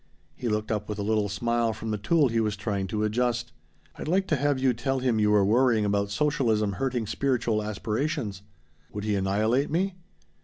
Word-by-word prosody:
He 125 - -3
looked 105 0 -1
up 105 -1 -2
with 105 - -3
a 100 - -2
little 105 -1 +1
smile 115 +3 0
from 110 +1 -5
the 105 - -2
tool 145 +6 +3
he 115 0 0
was 105 -2 0
trying 100 -1 -2
to 105 +3 -2
adjust. 120 +2 0 0.5
"I'd - - -5
like 190 +4 +2
to 155 - +3
have 145 0 +1
you 130 -1 +2
tell 135 +3 -1
him 125 -4 +1
you 105 0 +3
were 105 -2 +4
worrying 115 0 +3
about 100 0 0
socialism 115 -5 +1
hurting 125 0 -1
spiritual 120 -2 0
aspirations." 110 +1 -2 0.5
"Would 105 - -4
he 105 -1 0
annihilate 105 +7 +1
me?" 185 +5 0
110 Hz, 195 wpm, -27 LUFS, 105-130 Hz, 0.5 s, were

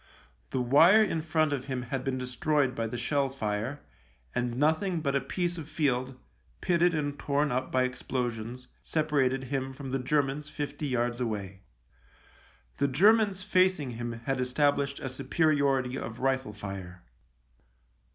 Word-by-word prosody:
The 130 - -1
wire 165 - +6
in 165 -6 -1
front 155 -1 +1
of 130 -2 -3
him 130 -2 -3
had 130 +1 -3
been 135 -1 -1
destroyed 130 +2 0
by 115 -1 -2
the 120 - -5
shell 140 +3 0
fire, 115 +2 -3 0.5
and 120 -1 -1
nothing 160 +5 +2
but 140 -3 -1
a 140 - +2
piece 175 +5 -2
of 155 -1 -8
field, 130 -4 0 0.4
pitted 175 -1 +2
and 145 -2 -2
torn 145 0 +1
up 130 +1 -1
by 130 0 +3
explosions, 125 -1 -3
separated 145 -4 +1
him 135 0 -3
from 135 -1 -7
the 135 - 0
Germans 145 +2 0
fifty 145 0 -4
yards 120 -1 -1
away. 100 -5 -4 1.2
The 140 - +2
Germans 200 - +4
facing 185 -7 +2
him 120 0 -4
had 125 +3 -2
established 140 +2 +1
a 135 - -4
superiority 135 -2 +1
of 110 +1 -6
rifle 130 -4 0
fire. 95 -3 -7
135 Hz, 150 wpm, -29 LUFS, 125-150 Hz, 1.2 s, wire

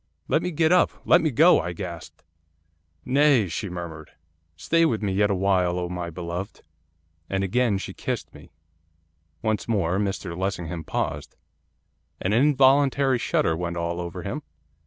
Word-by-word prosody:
'"Let 160 - +2
me 180 - -2
get 160 -1 +1
up! 180 - +4
let 175 - +5
me 160 - +1
go!" 160 +7 +5
I 90 - -4
gasped. 85 -2 -8 0.8
'"Nay," 135 -5 +4
she 100 +4 -4
murmured, 85 -3 -7 0.5
"stay 165 - +1
with 115 -9 +1
me 100 - 0
yet 105 +1 +2
awhile, 95 -2 +1
O 90 -1 -3
my 90 -1 -4
beloved." 85 +4 -6 0.7
'And 95 0 -1
again 110 +1 +1
she - - -6
kissed - - -4
me.' - - -14 0.9
Once 110 -2 -1
more 95 -5 0
Mr 95 -3 -3
Lessingham 90 -3 -3
paused. - - -3 0.8
An 95 - -1
involuntary 135 0 +4
shudder 80 - +1
went 85 +1 -4
all 85 +1 -2
over 85 +1 -6
him. 120 +10 -4
100 Hz, 150 wpm, -24 LUFS, 90-130 Hz, 0.9 s, let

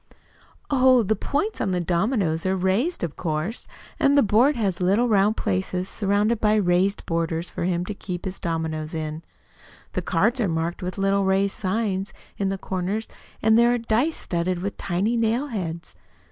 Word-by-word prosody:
"Oh, 255 -3 +5
the 220 +2 +1
points 295 - -2
of 190 - 0
the 180 - 0
dominoes 175 -1 0
are 190 - +2
raised, 190 - 0
of 160 -4 -3
course, 165 +6 -3 0.3
and 280 +1 +4
the 280 - +6
board 235 +8 +4
has 195 -6 -1
little 200 +7 +3
round 210 0 +3
places 100 - -1
surrounded 205 +3 +1
by 215 0 +3
raised 190 0 +2
borders 165 0 -2
for - - -3
him 175 -1 0
to 210 - -4
keep 180 -3 -6
his 190 0 -4
dominoes 160 -1 -3
in. 155 0 -4 0.7
The - - -1
cards 245 +1 +1
are 210 - +2
marked 165 +1 -2
with 180 +1 -4
little 195 0 +2
raised 195 +1 +2
signs 195 -1 -1 0.2
in 195 -1 -1
the 195 - -2
corners, 190 +4 -3 0.4
and 220 +1 +5
there 235 0 +5
are - - 0
dice 235 +7 0
studded 175 +1 -1
with 200 - -3
tiny 200 +6 0
nailheads. 220 - -2
195 Hz, 175 wpm, -24 LUFS, 175-220 Hz, 0.7 s, the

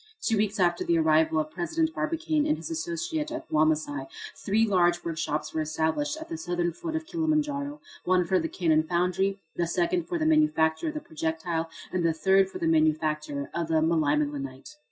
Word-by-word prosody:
Two 230 -10 +1
weeks 210 0 0
after 175 -1 +2
the 170 - +2
arrival 160 0 +3
of 155 0 -2
President 320 - -1
Barbicane 310 -1 0
and 305 - +1
his - - -7
associate 330 -1 -2
at 320 +1 -6
Wamasai 155 -3 +1 0.3
three 215 +3 +1
large 175 -4 +2
workshops 155 -2 -2
were 160 - 0
established 160 - -1
at 320 - -8
the 160 - -5
southern 175 0 -1
foot 320 - -5
of 320 0 -2
Kilimanjaro, 300 -3 -1 0.2
one 180 -1 +2
for 185 +2 +2
the 165 -1 -2
cannon 160 -4 +2
foundry, 180 +4 0 0.2
the 170 - +1
second 345 - 0
for 345 - -1
the 315 - -1
manufacture 305 - +3
of 310 - -3
the 305 - -3
projectile, 160 - -3 0.2
and 180 -1 -1
the 165 -1 +2
third 190 +3 +3
for - - -7
the - - -2
manufacture 155 -2 +1
of 170 -1 -2
the 160 - 0
melimelonite. 150 - 0
175 Hz, 185 wpm, -27 LUFS, -, 0.3 s, arrival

